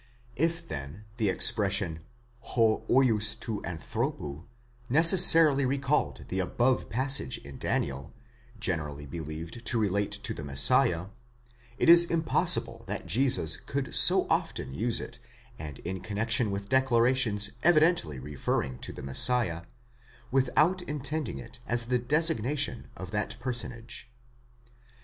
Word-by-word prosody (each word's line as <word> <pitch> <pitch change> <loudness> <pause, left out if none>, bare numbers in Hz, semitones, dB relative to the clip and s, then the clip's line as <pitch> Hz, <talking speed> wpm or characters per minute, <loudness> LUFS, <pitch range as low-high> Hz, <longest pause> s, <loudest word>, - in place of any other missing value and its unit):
8 145 - -3
If, 170 0 -5
then, 70 +9 -8
the 110 -4 0
expression 95 -3 0 0.4
6 - - -7
vids 110 -2 +1 0.5
τοῦ 115 -3 -5
ἀνθρώπου 80 -2 -6 0.4
necessarily 160 -1 +7
recalled 135 - -2
the 95 - -2
above 120 +8 -1
passage 130 - +3
in 70 -1 -13
Daniel, 70 +2 -4 0.5
generally 75 -8 -4
believed 80 - -8
to 120 - -1
relate 100 -1 -2
to 105 0 -4
the 75 - -9
Messiah, 75 +5 +2 0.7
it - - -1
is 170 +1 +7
impossible 165 -1 0
that - - -5
Jesus 125 - +5
could 140 -1 -6
so - - +5
often 65 - -3
use 115 - +2
it, 120 0 -9 0.4
and 75 -3 -9
in 95 +1 -6
con 100 - -8
nexion 115 0 0
with 100 0 -6
declarations 120 -4 +1
evidently 160 - +2
referring 65 -1 -4
to - - -5
the - - -11
Messiah, 85 - +1 0.7
without 150 +8 +1
intending 150 - -5
it 65 - -12
as 120 0 -2
the 125 +1 -1
designation 145 -1 -1
of 95 -1 -9
that 105 -1 -4
personage. 120 -2 -5
115 Hz, 125 wpm, -27 LUFS, 85-135 Hz, 0.7 s, necessarily